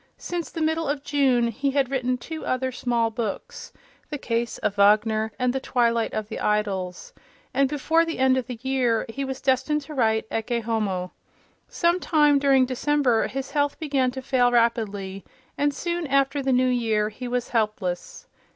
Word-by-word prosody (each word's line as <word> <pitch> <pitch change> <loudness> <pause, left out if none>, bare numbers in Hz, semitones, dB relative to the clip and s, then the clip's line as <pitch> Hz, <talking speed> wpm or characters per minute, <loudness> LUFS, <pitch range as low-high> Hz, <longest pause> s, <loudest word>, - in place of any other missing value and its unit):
Since 345 -2 -4
the 325 - -3
middle 320 +1 0
of 285 -1 -2
June 260 -5 +2
he 275 +5 -1
had 270 -1 0
written 255 -2 0
two 315 +6 -7
other 260 0 -1
small 235 -2 0
books, 220 -3 -5 0.4
"The 295 - -3
Case 235 -3 -2
of 200 - -1
Wagner" 215 +2 +3
and 250 -1 +1
"The 265 - -1
Twilight 235 -3 +1
of 215 -1 -3
the 220 - -6
Idols," 195 -4 -2 0.4
and 275 -1 +2
before 315 +3 +2
the 330 0 -4
end 260 0 +4
of 255 -2 -2
the 250 -2 -6
year 255 -4 +1
he 275 +5 -4
was 265 0 -5
destined 275 +3 +1
to 290 +2 -10
write 220 -5 +1
"Ecce 230 +1 -1
Homo." 195 -6 -1 0.6
Some 345 +1 +1
time 295 -5 +3
during 270 -2 +4
December 255 -2 +1
his 270 +1 -5
health 290 -1 0
began 275 -5 +1
to 260 +1 -7
fail 250 -2 +2
rapidly, 205 -5 0 0.3
and 290 0 +1
soon 345 +2 -3
after 275 +1 +2
the 265 0 0
New 255 0 +3
Year 220 -4 +1
he 245 +4 -7
was 245 0 -2
helpless. 210 -6 -2
250 Hz, 180 wpm, -24 LUFS, 225-275 Hz, 0.6 s, end